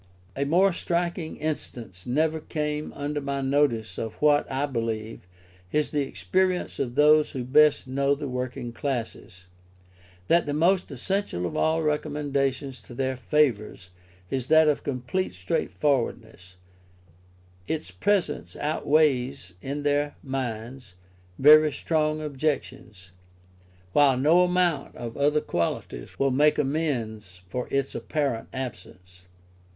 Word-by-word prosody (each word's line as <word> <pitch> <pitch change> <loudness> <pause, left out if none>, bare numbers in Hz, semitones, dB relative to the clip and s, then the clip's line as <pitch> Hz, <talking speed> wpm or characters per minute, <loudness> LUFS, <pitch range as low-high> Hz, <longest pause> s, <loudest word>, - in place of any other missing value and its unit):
A 140 - -1
more 180 +6 +4
striking 170 -1 -2
instance 120 - -5
never 155 +5 +1
came 150 -1 -3
under 145 +1 -3
my 140 0 -2
notice 135 -5 +1
of 110 -1 -4
what, 145 -2 +2
I 135 +2 0
believe, 115 -6 -4 0.4
is 150 0 0
the 150 - +1
experience 185 +6 -1
of 125 -3 -2
those 150 +1 +5
who 130 -3 -3
best 150 +4 +4
know 140 +2 +1
the 145 0 -5
working 125 -2 -4
classes, 115 -7 -5 0.8
that 170 +4 +3
the 145 - -1
most 180 +4 +2
essential 140 - -2
of 85 - -4
all 160 +1 +1
recommendations 140 -3 -1
to 120 - -13
their 130 +1 -1
favour 130 -5 +1 0.6
is 130 -2 -2
that 160 0 +6
of 150 - +2
complete 130 - -3
straightforwardness; 95 0 -2 1.1
its 160 0 -3
presence 200 -7 -1
outweighs 140 - +1
in 145 +2 -4
their 145 0 +1
minds 120 -4 -5 0.4
very 155 +2 +7
strong 155 +1 0
objections, 135 -9 -4 0.8
while 140 -3 +5
no 155 +7 +5
amount 180 -5 +1
of 115 -1 -7
other 150 +2 +2
qualities 70 -7 -3
will 135 0 +2
make 150 +4 +3
amends 115 - -2
for 125 +6 -4
its 140 0 -1
apparent 140 -7 -2
absence. 90 -8 -8
140 Hz, 125 wpm, -26 LUFS, 120-150 Hz, 1.1 s, very